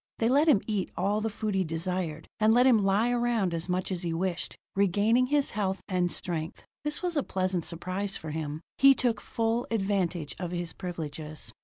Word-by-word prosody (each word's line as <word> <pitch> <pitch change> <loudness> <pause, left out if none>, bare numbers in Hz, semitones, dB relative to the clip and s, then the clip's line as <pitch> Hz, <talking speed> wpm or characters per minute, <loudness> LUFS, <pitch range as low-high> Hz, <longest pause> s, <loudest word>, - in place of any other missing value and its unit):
They 225 - +2
let 285 +5 +4
him 255 -11 +5
eat 210 -4 -1
all 200 +4 +1
the 225 - 0
food 215 0 -3
he 190 -1 +2
desired, 165 -1 -3
and 215 0 +5
let 250 +1 +6
him 230 -6 +5
lie 205 +5 +3
around 235 -7 +1
as 165 +2 -3
much 185 +2 -1
as 180 -2 -2
he 170 -2 -2
wished, 175 0 -2 0.2
regaining 205 +6 +3
his 290 0 +1
health 195 -2 -1
and 180 -2 +1
strength. 165 -2 -4 0.2
This 300 +4 -2
was 350 -2 0
a 290 - +3
pleasant 185 -6 -1
surprise 185 +4 -2
for 155 - -6
him: 155 0 -4 0.2
he 275 0 +8
took 245 -3 +1
full 230 +1 -1
advantage 190 -7 -1
of 180 -2 -3
his 175 -1 -3
privileges. 155 - -5
190 Hz, 195 wpm, -28 LUFS, 175-225 Hz, 0.2 s, he